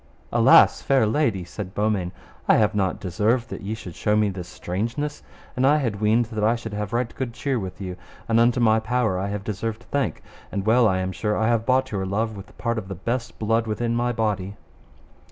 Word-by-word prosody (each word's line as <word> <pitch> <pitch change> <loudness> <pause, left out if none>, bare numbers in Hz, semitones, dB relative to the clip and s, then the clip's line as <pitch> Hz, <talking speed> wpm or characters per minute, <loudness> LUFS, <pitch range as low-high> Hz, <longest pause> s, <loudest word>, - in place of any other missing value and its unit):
Alas, - - +6
fair 135 -4 +3
lady, 110 -5 +1
said 95 +2 -7
Beaumains, 105 -4 0 0.4
I - - +6
have 105 -2 +3
not 95 -2 0
deserved 105 +6 0
that - - -5
ye 105 +2 -3
should 90 -6 -9
show 105 +4 0
me 105 -1 +3
this 90 -2 -6
strangeness, 115 +14 -3 0.3
and 125 - 0
I 145 +3 +5
had 115 -8 -2
weened 110 +3 +3
that 110 -1 -2
I 110 +2 +4
should 115 -2 -7
have 105 0 -3
right 120 0 -1
good 125 -3 -3
cheer 135 0 -1
with 95 -3 -6
you, 90 -2 -5 0.3
and 115 0 +3
unto 120 +1 +4
my 110 -2 +4
power 110 -4 0
I 95 - -2
have 100 0 -4
deserved 110 +3 -4
thank, 140 -2 -1 0.3
and 100 -1 -3
well 115 +1 +5
I 95 -3 +2
am 95 0 -2
sure 105 +3 -1
I 110 +1 +2
have 115 -1 +1
bought 130 0 +2
your 95 -2 -2
love 110 +3 -1
with 100 0 -11
part 115 -1 -1
of 100 - -9
the 95 - -5
best 115 +7 -3
blood 115 +1 +1
within 115 +2 -1
my 120 +1 +1
body. 105 -4 -1
110 Hz, 220 wpm, -24 LUFS, 100-120 Hz, 0.4 s, Alas